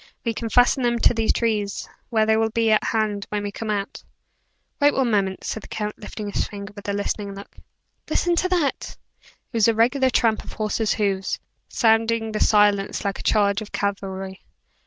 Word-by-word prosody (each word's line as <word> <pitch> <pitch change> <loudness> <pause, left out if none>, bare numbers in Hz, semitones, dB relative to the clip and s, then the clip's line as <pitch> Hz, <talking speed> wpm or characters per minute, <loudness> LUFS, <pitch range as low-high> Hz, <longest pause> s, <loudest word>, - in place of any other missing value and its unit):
We 230 - 0
can 225 +1 -4
fasten 245 +3 +4
them 240 -1 +1
to - - +4
these 225 -1 +1
trees, 210 -4 -1 0.2
where 220 -3 +2
they 220 0 +3
will 225 0 +2
be 225 0 +1
at 215 - +3
hand 215 -2 -1
when 210 -1 -2
we 205 - -3
come 220 +2 -6
out." 200 -2 -3 0.8
"Wait 290 0 +4
one 255 -3 +1
moment," 195 -2 0
said 220 - -4
the - - -12
count, 210 -1 -4
lifting 210 0 -6
his - - -1
finger 200 0 -8
with 205 -1 -7
a - - 0
listening 200 0 -3
look. 200 - -11 0.5
"Listen 350 0 +1
to 370 - +1
that!" 340 -7 -1 0.2
It - - -29
was 225 -2 +4
a 230 - +3
regular 260 +4 +3
tramp 225 -3 +2
of - - -10
horses' 215 0 0
hoofs, 195 -3 -1 0.3
sounding 225 0 +2
in 220 - -5
the 215 - -2
silence 205 -2 +3
like 200 - -2
a - - -5
charge 200 -1 +2
of 215 - -9
cavalry. 195 -1 -3
215 Hz, 200 wpm, -23 LUFS, 200-230 Hz, 0.8 s, fasten